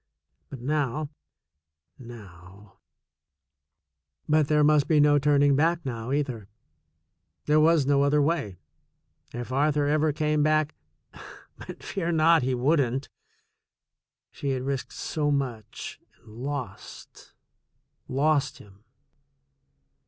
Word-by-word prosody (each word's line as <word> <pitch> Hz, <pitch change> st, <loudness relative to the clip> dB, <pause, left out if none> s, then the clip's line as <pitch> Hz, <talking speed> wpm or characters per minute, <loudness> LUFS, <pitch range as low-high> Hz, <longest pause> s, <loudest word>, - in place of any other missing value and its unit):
But 130 Hz, -, -9 dB
now, 145 Hz, +1 st, -2 dB, 0.9 s
now 100 Hz, -4 st, -14 dB, 1.5 s
But 155 Hz, -1 st, +3 dB
there 150 Hz, 0 st, +3 dB
must 150 Hz, -1 st, +3 dB
be 155 Hz, -2 st, +3 dB
no 145 Hz, 0 st, +5 dB
turning 145 Hz, 0 st, +3 dB
back 165 Hz, +3 st, +1 dB
now, 120 Hz, -1 st, -5 dB
either. 130 Hz, -8 st, -2 dB, 1.0 s
There 150 Hz, +1 st, +3 dB
was 155 Hz, -2 st, +4 dB
no 140 Hz, 0 st, +3 dB
other 140 Hz, +1 st, +3 dB
way. 145 Hz, -, -1 dB, 0.7 s
If 120 Hz, +1 st, -6 dB
Arthur 145 Hz, +2 st, +1 dB
ever 155 Hz, +1 st, +2 dB
came 150 Hz, 0 st, 0 dB
back 155 Hz, 0 st, +2 dB, 0.2 s
— -, -, -49 dB
THE -, -, -15 dB
SECOND -, -, -11 dB
CHOICE -, -, -16 dB
15^. -, -, -22 dB
but -, -, -10 dB
fear 170 Hz, -3 st, -3 dB
not, 165 Hz, 0 st, +4 dB
he 130 Hz, 0 st, 0 dB
wouldn't! 135 Hz, 0 st, 0 dB, 1.2 s
She 140 Hz, -, -5 dB
had 130 Hz, -1 st, -3 dB
risked 135 Hz, -1 st, -3 dB
so 150 Hz, -2 st, -2 dB
muc^ 125 Hz, -7 st, -4 dB, 0.2 s
and -, -, -28 dB
lost 135 Hz, +2 st, -8 dB, 0.4 s
— -, -, -50 dB
lost 145 Hz, +1 st, 0 dB
him. 100 Hz, +1 st, -18 dB
145 Hz, 125 wpm, -26 LUFS, 125-150 Hz, 1.5 s, no